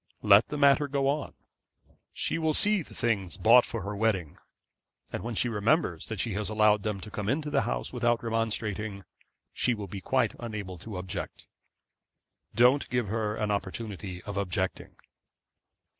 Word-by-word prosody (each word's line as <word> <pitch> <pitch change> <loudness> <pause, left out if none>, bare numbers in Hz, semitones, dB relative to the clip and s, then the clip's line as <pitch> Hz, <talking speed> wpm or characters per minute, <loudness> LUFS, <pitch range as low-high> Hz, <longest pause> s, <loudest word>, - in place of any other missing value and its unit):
Let 105 +1 +6
the 150 - -4
matter 140 +1 +4
go 140 -1 0
on. 145 +1 -1 0.8
She - - -1
will 160 -2 +1
see 210 -2 +5
the - - -11
things 105 -6 -1
bought 120 +3 +6
for 115 -4 -5
her 100 +1 -4
wedding, 100 -7 -1 0.7
and - - -3
when 115 0 -4
she 120 - +1
remembers 110 - 0
that 110 -3 -5
she 115 0 -1
has 105 0 -2
allowed 105 -1 +3
them 105 -1 -2
to 105 - -9
come 105 0 -3
into 150 +3 -1
the 140 -2 +3
house - - -3
without 120 -1 +1
remonstrating, 110 -3 -2 0.5
she 125 - +1
will 105 -2 -6
be 95 +1 -7
quite - - +1
unable 105 -6 -6
to 100 +1 -7
object. 95 +2 -6 1.1
Don't 125 +4 +4
give 120 -5 -1
her 110 -1 -1
an 105 -1 -1
opportunity 100 -2 -4
of 100 -1 -6
objecting.' 95 -1 -3
110 Hz, 165 wpm, -28 LUFS, 100-120 Hz, 1.1 s, Let